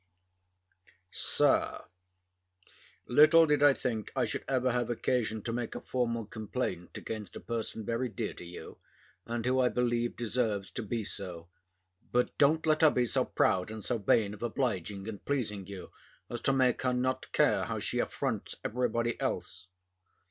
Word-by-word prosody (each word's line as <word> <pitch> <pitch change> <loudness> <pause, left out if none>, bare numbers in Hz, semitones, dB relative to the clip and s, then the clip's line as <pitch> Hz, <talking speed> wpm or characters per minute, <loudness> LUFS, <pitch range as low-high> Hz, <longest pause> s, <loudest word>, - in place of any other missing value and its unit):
SIR, - - +2 1.2
Little 155 +5 +7
did 150 -2 +2
I 145 -2 +7
think 115 -4 -3
I 130 -2 +2
should 110 - -3
ever 130 -1 +1
have 120 -1 0
occasion 110 -2 0
to 115 - -3
make 120 -1 -3
a - - -3
formal 115 -3 -1
complaint 105 -4 -4
against 110 -2 -6
a - - -5
person 115 -2 -4
very 120 +3 -1
dear 105 - -4
to - - -10
you, 90 0 -10 0.5
and 115 0 -3
who 130 +1 +2
I 125 -1 +4
believe 120 -1 0
deserves 110 -4 -1
to - - -4
be 115 +1 -3
so; 90 -4 -5 0.6
but 125 0 +1
don't 155 +3 +4
let 155 -1 +3
her 160 - +8
be 125 -3 +1
so 115 - +1
proud 90 +1 +1
and 110 -1 -7
so 120 -2 0
vain 105 0 +2
of 105 - -11
obliging 105 -6 -2
and 105 -3 -7
pleasing 105 -9 -2
you, 100 -2 -8 0.4
as 120 -1 -4
to - - +3
make 130 -2 +2
her 125 -1 +1
not 130 +1 -1
care - - +3
how - - -3
she - - -1
affronts - - -2
every 125 +2 0
body 115 0 -1
else. 95 +1 -3
120 Hz, 170 wpm, -31 LUFS, 105-125 Hz, 1.2 s, her